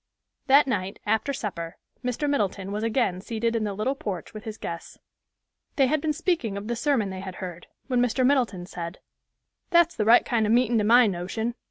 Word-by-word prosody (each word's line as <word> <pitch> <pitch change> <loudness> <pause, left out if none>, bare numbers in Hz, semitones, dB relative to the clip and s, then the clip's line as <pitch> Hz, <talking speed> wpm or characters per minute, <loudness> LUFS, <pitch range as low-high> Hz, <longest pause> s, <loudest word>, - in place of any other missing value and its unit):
That 280 +2 +7
night, 195 -6 -2
after 220 +6 +1
supper, 175 -10 -5 0.3
Mr. 250 +4 -1
Middleton 200 -8 -1
was 210 +1 -2
again 225 -5 0
seated 230 +2 -1
in 220 -1 0
the 205 - -2
little 215 +7 0
porch 200 -9 -5
with 215 0 -9
his 220 -1 -6
guests. 170 -1 -7 0.8
They 275 - +4
had 305 +3 +1
been 310 - 0
speaking 305 - -1
of 200 +1 -6
the 240 - -1
sermon 235 -5 +1
they 190 - -6
had 190 -1 -7
heard, 180 -2 -7 0.2
when 250 -2 +1
Mr. 250 +1 +2
Middleton 245 -10 +1
said, 170 -1 -6 0.7
"That's 345 -1 +4
the 215 - 0
right 230 +2 +6
kind 225 -3 +1
of - - +1
meetin' 240 -1 +3
to - - +1
my 240 +3 +6
notion. 200 +5 -2
225 Hz, 200 wpm, -26 LUFS, 195-255 Hz, 0.8 s, That